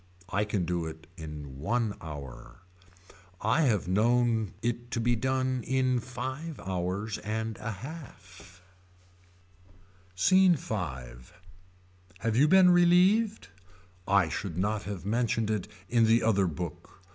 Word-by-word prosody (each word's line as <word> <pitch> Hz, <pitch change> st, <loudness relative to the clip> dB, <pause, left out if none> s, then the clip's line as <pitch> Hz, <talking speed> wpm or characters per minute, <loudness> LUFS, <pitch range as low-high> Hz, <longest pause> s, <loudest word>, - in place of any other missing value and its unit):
I 105 Hz, +1 st, 0 dB
can 105 Hz, -4 st, -1 dB
do 85 Hz, -1 st, -2 dB
it 80 Hz, +1 st, -9 dB
in 75 Hz, -5 st, -8 dB
one 115 Hz, -, 0 dB
hour. 70 Hz, -3 st, -9 dB, 0.8 s
I 110 Hz, +9 st, +2 dB
have 105 Hz, -8 st, +1 dB
known 115 Hz, +1 st, +2 dB
it 120 Hz, 0 st, -2 dB
to 115 Hz, -, -2 dB
be 120 Hz, +1 st, +2 dB
done 130 Hz, +1 st, 0 dB
in 130 Hz, 0 st, +1 dB
five 130 Hz, +6 st, -6 dB
hours 95 Hz, +3 st, -3 dB
and 110 Hz, +1 st, -3 dB
a 110 Hz, -, -4 dB
half 95 Hz, -, -10 dB, 1.5 s
SCENE 185 Hz, -, +5 dB
V. 135 Hz, -, -6 dB, 1.4 s
Have 110 Hz, +2 st, -1 dB
you 140 Hz, +5 st, +5 dB
been 185 Hz, +2 st, +7 dB
relieved. 180 Hz, -, +4 dB, 0.6 s
I 100 Hz, -3 st, +4 dB
should 85 Hz, +1 st, -4 dB
not 105 Hz, +3 st, -1 dB
have 100 Hz, -3 st, -6 dB
mentioned 115 Hz, 0 st, 0 dB
it 105 Hz, -3 st, -2 dB, 0.2 s
in 115 Hz, -2 st, +3 dB
the 115 Hz, +1 st, +4 dB
other 100 Hz, -4 st, +3 dB
book. 85 Hz, +2 st, -7 dB
110 Hz, 125 wpm, -29 LUFS, 95-130 Hz, 1.5 s, been